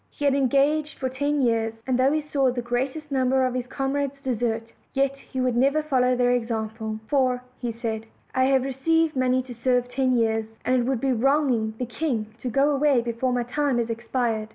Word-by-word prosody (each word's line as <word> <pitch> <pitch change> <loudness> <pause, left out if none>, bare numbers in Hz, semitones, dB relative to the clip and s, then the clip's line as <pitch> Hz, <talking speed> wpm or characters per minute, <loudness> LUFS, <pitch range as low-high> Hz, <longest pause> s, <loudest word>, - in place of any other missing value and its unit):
He 290 - -5
had 280 - +4
en 275 -1 +2
gaged 290 +2 +1
for 260 - -2
ten 285 +2 0
years; 225 -2 +1
and 260 - +1
though 265 +2 +4
he 310 +1 +1
saw 280 -3 +1
the 245 -1 -4
greatest 265 +5 -3
number 260 -1 +2
of 255 - -1
his 250 -1 -3
comrades 275 +1 -2
desert, 230 -3 -2 0.2
yet 275 0 +2
he 270 -1 -8
would 255 -2 +1
never 275 +5 +3
follow 255 -4 +2
their 245 0 +2
example. 220 -2 -2
"For," 255 -2 +1 0.2
said 230 -2 -3
he, - - -27 0.2
"I 260 0 +3
have 265 -1 +3
received 310 +4 +1
money 255 0 +2
to 250 -1 -9
serve 245 +1 +1
ten 255 0 +1
years, 225 -1 0
and 255 - +3
it 245 -2 +2
would 260 -4 0
be 270 - +1
wronging 250 -3 +1
the 250 - -2
king 230 -3 -3
to 250 - -3
go 275 +5 +3
away 280 -3 +3
before 235 +2 -1
my 245 -1 0
time 275 +1 0
is 235 -1 0
expired." 230 -2 -2
255 Hz, 210 wpm, -25 LUFS, 235-275 Hz, 0.2 s, had